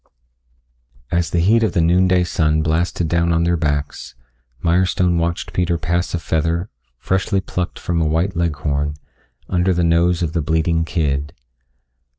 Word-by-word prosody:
As 85 Hz, -1 st, +1 dB
the 85 Hz, -, 0 dB
heat 110 Hz, +6 st, +4 dB
of 110 Hz, -, +1 dB
the 95 Hz, -, +1 dB
noon 90 Hz, +3 st, +3 dB
day 90 Hz, -1 st, +3 dB
sun 80 Hz, -3 st, +1 dB
blasted 80 Hz, +2 st, 0 dB
down 85 Hz, +1 st, +1 dB
on 85 Hz, 0 st, +2 dB
their 85 Hz, +1 st, +2 dB
backs, 75 Hz, -5 st, -3 dB, 0.5 s
Mirestone 90 Hz, 0 st, +2 dB
watched 85 Hz, 0 st, -2 dB
Peter 90 Hz, -2 st, 0 dB
pass 85 Hz, +3 st, -1 dB
a -, -, 0 dB
feather, 80 Hz, +2 st, -1 dB, 0.3 s
freshly 95 Hz, -, 0 dB
plucked 90 Hz, -1 st, -4 dB
from 85 Hz, -1 st, -1 dB
a 80 Hz, -, +1 dB
white 85 Hz, +5 st, 0 dB
Leghorn, 75 Hz, -3 st, -1 dB, 0.5 s
under 90 Hz, 0 st, +1 dB
the 85 Hz, -, +1 dB
nose 85 Hz, +1 st, +2 dB
of 80 Hz, -1 st, -2 dB
the 85 Hz, -, 0 dB
bleating 80 Hz, +1 st, 0 dB
kid. 75 Hz, -4 st, -1 dB
85 Hz, 160 wpm, -19 LUFS, 80-90 Hz, 0.5 s, heat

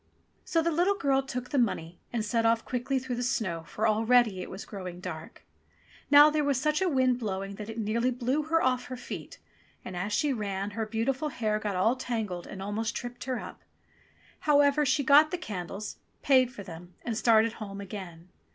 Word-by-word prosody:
So 330 Hz, -1 st, +1 dB
the 335 Hz, -, +1 dB
little 355 Hz, +5 st, +2 dB
girl 275 Hz, -6 st, +2 dB
took 250 Hz, -2 st, -6 dB
the 280 Hz, -, +2 dB
money 175 Hz, -7 st, -1 dB
and 230 Hz, -3 st, -1 dB
set 230 Hz, +1 st, +1 dB
off 230 Hz, 0 st, +2 dB
quickly 255 Hz, +2 st, -1 dB
through 255 Hz, -2 st, -3 dB
the -, -, -2 dB
snow, 200 Hz, -9 st, -1 dB
for 215 Hz, -, 0 dB
already 220 Hz, -2 st, +3 dB
it -, -, -7 dB
was 190 Hz, -, -7 dB
growing 185 Hz, -4 st, -7 dB
dark. 180 Hz, -, -8 dB, 0.6 s
Now 295 Hz, +1 st, +8 dB
there 300 Hz, 0 st, +1 dB
was 280 Hz, -3 st, +1 dB
such 305 Hz, +4 st, +1 dB
a 375 Hz, -, +2 dB
wind 260 Hz, -4 st, +2 dB
blowing 195 Hz, -3 st, -3 dB
that 210 Hz, 0 st, -7 dB
it 225 Hz, -, -7 dB
nearly 230 Hz, +3 st, 0 dB
blew 255 Hz, +4 st, 0 dB
her 330 Hz, +1 st, +2 dB
off 255 Hz, -1 st, +1 dB
her 255 Hz, -, -6 dB
feet, -, -, -8 dB, 0.5 s
and 185 Hz, -, -6 dB
as 185 Hz, +4 st, -3 dB
she 295 Hz, +5 st, +1 dB
ran, 200 Hz, -3 st, -3 dB
her 220 Hz, +1 st, -3 dB
beautiful 250 Hz, +7 st, -1 dB
hair 215 Hz, -5 st, -1 dB
got 210 Hz, -2 st, -3 dB
all 220 Hz, +7 st, +3 dB
tangled 220 Hz, -8 st, -3 dB
and 195 Hz, -, -7 dB
almost 220 Hz, +3 st, -2 dB
tripped 245 Hz, 0 st, -6 dB
her 260 Hz, -1 st, -2 dB
up. -, -, -9 dB, 0.8 s
However, 290 Hz, 0 st, +4 dB
she 280 Hz, +2 st, +2 dB
got 295 Hz, +2 st, +7 dB
the 360 Hz, -, -2 dB
candles, 200 Hz, -, -6 dB, 0.3 s
paid 260 Hz, -3 st, +4 dB
for 205 Hz, -, -9 dB
them, 175 Hz, 0 st, -11 dB
and 235 Hz, -, -2 dB
started 225 Hz, 0 st, +4 dB
home 200 Hz, -1 st, -6 dB
again. 185 Hz, -4 st, -8 dB
235 Hz, 200 wpm, -29 LUFS, 205-270 Hz, 0.8 s, Now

